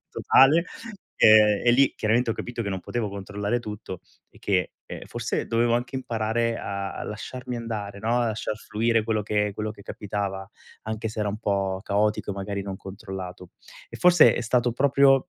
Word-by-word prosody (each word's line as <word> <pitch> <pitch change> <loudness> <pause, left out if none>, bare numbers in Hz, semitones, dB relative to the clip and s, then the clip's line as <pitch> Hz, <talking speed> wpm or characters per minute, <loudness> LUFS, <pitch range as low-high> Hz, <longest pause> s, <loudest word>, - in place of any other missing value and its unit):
totale, 155 +6 +5 0.5
ehm, 105 -1 +6
e - - +7
lì 135 +2 +4
chiaramente 115 +3 +1
ho - - -1
capito 120 -1 -5
che 100 - -3
non 95 -2 -3
potevo 115 +1 -3
controllare 100 +3 -3
tutto, 105 -4 -7 0.3
e - - -19
che, 95 -3 0
ehm, - - -8
forse - - -3
dovevo 115 +1 +2
anche 125 +2 -2
imparare 115 -1 -1
a 100 0 -5 0.2
a - - -4
lasciarmi 125 +3 -6
andare, 105 -4 -5
no, 115 +3 +1
a 120 - +1
lasciar 110 -1 -3
fluire 115 +1 0
quello 110 -1 0
che 105 0 0
quello 105 +1 -3
che 105 -2 -12
capitava, 95 -1 -4 0.3
anche 110 +1 -4
se 110 0 -5
era 105 - 0
un 105 +2 -4
po' 100 -3 -1
caotico, 105 0 0
magari 100 0 -4
non 95 -1 -5
controllato 95 -2 -8 0.4
e - - -9
forse 175 -2 +6
è - - -2
stato 120 0 +1
proprio, 135 +3 +4
110 Hz, 180 wpm, -25 LUFS, 100-120 Hz, 0.5 s, e